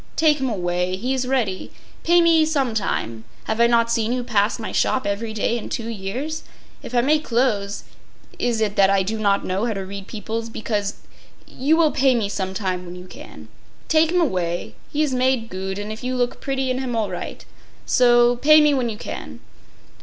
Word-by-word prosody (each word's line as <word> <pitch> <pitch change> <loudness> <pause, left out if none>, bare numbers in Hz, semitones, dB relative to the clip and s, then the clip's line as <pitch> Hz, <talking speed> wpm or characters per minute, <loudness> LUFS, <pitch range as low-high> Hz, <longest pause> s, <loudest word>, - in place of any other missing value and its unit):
Take 305 -2 +3
him 265 -1 -1
away. 180 -3 -1
He 245 +8 -2
is 260 -1 -1
ready. 230 -8 -1 0.3
Pay 345 +1 +5
me 330 -1 +5
some 280 -6 0
time. 115 - -2 0.2
Haf 220 +1 -3
I 235 - +6
not 230 -1 +3
seen 230 0 +1
you 250 0 -1
pass 215 -3 +1
mine 220 - -6
shop 260 - +1
every 205 +3 -2
day 220 +2 0
in - - -8
two 230 -1 -4
years? 235 +10 -4 0.4
If 250 - -7
I 240 - +5
make 300 +4 +2
clothes 220 -6 0 0.6
is 235 -2 0
it 210 -2 0
that 195 -1 +6
I 195 -1 +3
do 220 +3 -3
not 200 -2 +1
know 190 +4 -1
how 225 - -1
to 195 -2 -5
read 195 0 -8
beoples 225 +1 -5
because? 205 -3 -2 0.5
You 290 +5 +1
will 320 -3 +4
pay 265 -1 +3
me 215 -4 0
some 190 -1 -3
time 185 -3 -2
when 175 0 -9
you 180 0 -10
can. 185 - -12 0.4
Take 320 0 +4
him 360 - +2
away. 180 - -1 0.2
He 300 +1 +1
is 285 -4 -1
made 255 -2 +1
goot; 190 0 -4
and 205 +1 -5
if 220 +3 -8
you 255 +1 -2
look 245 -1 -1
bretty 270 -1 -1
in 255 - -1
him 255 -3 -3
all 215 -4 -1
right. 180 - -6 0.4
So. 240 -1 +4
Pay 305 +5 +7
me 300 -1 +4
when 255 -4 0
you 215 - -5
can. 80 - -7
230 Hz, 210 wpm, -22 LUFS, 200-260 Hz, 0.6 s, Pay